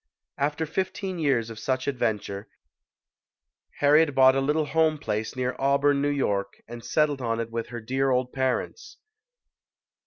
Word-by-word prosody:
After 150 +3 0
fifteen 190 +2 -3
years 125 -7 +1
of 110 - -9
such 130 +2 -2
adventure, 105 -6 -2 1.3
Harriet 145 0 +4
bought 130 0 +7
a 135 - +1
little 150 +3 +1
home 155 +1 +2
place 110 -4 -3
near 125 0 -2
Auburn, 140 +1 +2
N. 145 0 0
Y., 100 -6 +1 0.2
and 120 0 -9
settled 150 -3 +1
on 115 -1 -1
it 115 0 -4
with 115 0 -3
her 120 0 -6
dear 135 +4 0
old 125 -1 0
parents. 420 - -2
135 Hz, 150 wpm, -26 LUFS, 120-150 Hz, 1.3 s, bought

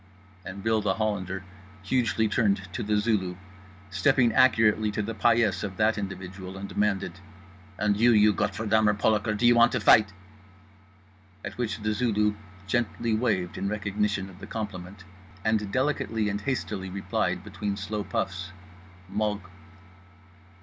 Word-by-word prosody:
_" - - -5
And 100 +1 -8
Bill 110 -1 +2
The 95 - 0
Hollander 95 -4 -2 0.4
hugely 110 0 +1
turned 100 -4 +1
to - - -3
The 105 0 +1
Zulu, 105 -4 0 0.6
stepping 120 +3 +3
accurately 110 -4 +4
to 105 0 -2
the 115 +2 -4
paillasse 115 -3 +2
of 95 -3 -5
that 110 +1 +3
individual, 95 -1 -6
and 100 +1 -6
demanded: 100 -3 -1 0.6
"And 105 0 +1
you, 120 +4 +4
you 105 -1 +5
Gottverdummer 105 +1 +1
Polaker, 105 0 +1
do 120 - +1
you 120 - +7
want 120 0 +5
t' 125 - +1
fight?" 105 -1 +6 1.3
at 100 0 -6
which 110 -3 -2
The 105 0 +1
Zulu 105 -2 +1 0.3
gently 115 +2 -1
waved 105 -7 0
in 100 +1 -1
recognition 105 -1 -1
of 95 -1 -14
the - - -9
compliment 95 -3 -6 0.4
and 110 -2 +1
delicately 130 -5 0
and 100 0 -3
hastily 105 -6 -3
replied, 95 -1 -2
between 100 -1 -4
slow 105 +1 -3
puffs: 95 -1 -3 0.6
"_Mog. 105 -1 0
105 Hz, 145 wpm, -27 LUFS, 100-110 Hz, 1.3 s, you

